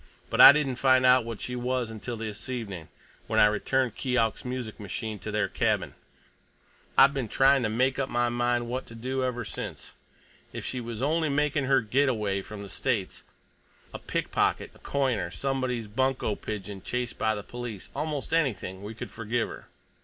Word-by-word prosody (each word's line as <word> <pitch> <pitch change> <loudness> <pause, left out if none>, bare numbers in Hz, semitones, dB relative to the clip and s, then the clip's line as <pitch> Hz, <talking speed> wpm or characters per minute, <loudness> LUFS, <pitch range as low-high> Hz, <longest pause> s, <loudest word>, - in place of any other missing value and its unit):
But - - +4
I - - +13
didn't 140 -4 0
find 130 -1 +4
out 125 -2 +6
what 115 -3 -6
she 125 - -4
was 125 -1 -1
until 115 +2 -6
this 110 +1 -6
evening, 100 -10 -5 0.4
when - - +1
I - - +8
returned 120 +3 +1
Keok's 125 -4 0
music 125 -3 -5
machine 105 +1 -5
to 110 - -6
their 105 0 +1
cabin. - - 0 1.0
I've 135 +1 +7
been 135 -5 -2
trying 135 +4 +4
to 110 - 0
make 130 +5 +1
up 135 0 -1
my 120 0 +1
mind 120 0 0
what 125 +2 -4
to 115 - -11
do 130 +3 -2
ever 125 -1 -2
since. - - -6 0.6
If - - -6
she 130 - -3
was 115 0 -5
only 160 +2 +1
making 145 0 +1
her 135 -1 +4
get 130 +6 +2
away 105 -5 -1
from 100 +1 -9
the - - -8
States, 110 -6 -2 0.7
a - - -6
pickpocket, - - -1
a - - -19
coiner, 135 -5 0
somebody's 130 -4 -2
bunco 130 +1 0
pigeon 100 -2 -6
chased 125 +4 -3
by 110 0 +2
the 105 - -6
police—almost 120 +7 -5
anything—we 110 - -1
could - - -7
forgive 115 +1 -2
her. - - -10
120 Hz, 175 wpm, -28 LUFS, 110-130 Hz, 1.0 s, I